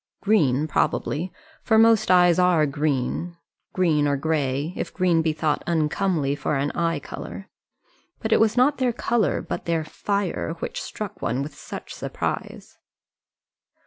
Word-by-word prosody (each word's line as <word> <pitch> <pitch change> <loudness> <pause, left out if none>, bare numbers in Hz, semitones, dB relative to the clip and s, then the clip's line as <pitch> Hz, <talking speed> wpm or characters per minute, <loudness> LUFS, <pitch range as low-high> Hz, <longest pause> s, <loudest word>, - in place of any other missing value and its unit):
Green 155 - +3
probably, 160 +3 -1 0.3
for 220 - +3
most 225 -2 +5
eyes 180 -1 +5
are 180 -4 +4
green 145 +4 -2 0.3
green 155 -5 +2
or 140 0 +1
grey, 145 +1 -1
if - - -4
green 180 -3 +2
be 160 -1 +1
thought 155 -1 -1
uncomely 160 -2 +1
for 145 +1 -2
an 140 +1 0
eye 165 -1 0
colour. - - -8 0.7
But 220 - -3
it - - +5
was 225 +1 +3
not 270 +3 +3
their 250 -2 +1
colour, 230 -3 0
but - - -5
their 165 -2 0
fire, 195 +1 -2
which - - -5
struck 205 -3 -7
one 125 +4 -1
with 145 +1 -7
such - - -8
surprise. - - -5
165 Hz, 145 wpm, -24 LUFS, 150-195 Hz, 0.7 s, most